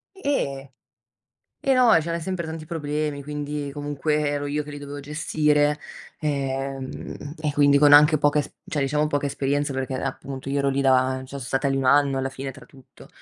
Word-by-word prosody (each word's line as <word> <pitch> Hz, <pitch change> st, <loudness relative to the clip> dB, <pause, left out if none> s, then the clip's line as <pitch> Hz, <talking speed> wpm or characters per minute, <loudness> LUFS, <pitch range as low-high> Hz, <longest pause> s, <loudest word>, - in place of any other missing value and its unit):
E 140 Hz, -, -2 dB, 1.0 s
e 270 Hz, -, +4 dB
no 250 Hz, -2 st, +5 dB
c'erano 170 Hz, +1 st, -3 dB
sempre 185 Hz, -1 st, -3 dB
tanti 160 Hz, -1 st, -6 dB
problemi, 150 Hz, -3 st, -3 dB
quindi 145 Hz, 0 st, -4 dB
comunque 145 Hz, +1 st, -1 dB
ero 145 Hz, 0 st, -1 dB
io 150 Hz, +1 st, -1 dB
che 150 Hz, -, -9 dB
li 145 Hz, -, -7 dB
dovevo 145 Hz, 0 st, -7 dB
gestire, 150 Hz, 0 st, +1 dB, 0.4 s
ehm, 135 Hz, 0 st, -4 dB
e 150 Hz, -2 st, -1 dB
quindi 145 Hz, -1 st, +5 dB
con 145 Hz, 0 st, +6 dB
anche 150 Hz, +1 st, +7 dB
poca 145 Hz, 0 st, +3 dB
es 145 Hz, -, -4 dB
cioè, 145 Hz, -, -2 dB
diciamo 150 Hz, +2 st, +1 dB
poca 145 Hz, -1 st, -1 dB
esperienza 140 Hz, +1 st, -1 dB
perché 130 Hz, 0 st, -3 dB
appunto 135 Hz, 0 st, -5 dB
io 140 Hz, 0 st, 0 dB
ero 140 Hz, -, +1 dB
lì 135 Hz, +1 st, 0 dB
da 130 Hz, -1 st, +3 dB
cioè, 130 Hz, -, -9 dB
sono 140 Hz, +1 st, -7 dB
stata 135 Hz, +3 st, 0 dB
lì 135 Hz, -, 0 dB
1 135 Hz, -, -1 dB
anno 140 Hz, 0 st, +4 dB
alla 135 Hz, 0 st, -1 dB
fine 135 Hz, 0 st, -6 dB
tra 130 Hz, -, -14 dB
tutto. 130 Hz, -2 st, -17 dB
145 Hz, 190 wpm, -24 LUFS, 135-150 Hz, 1.0 s, anche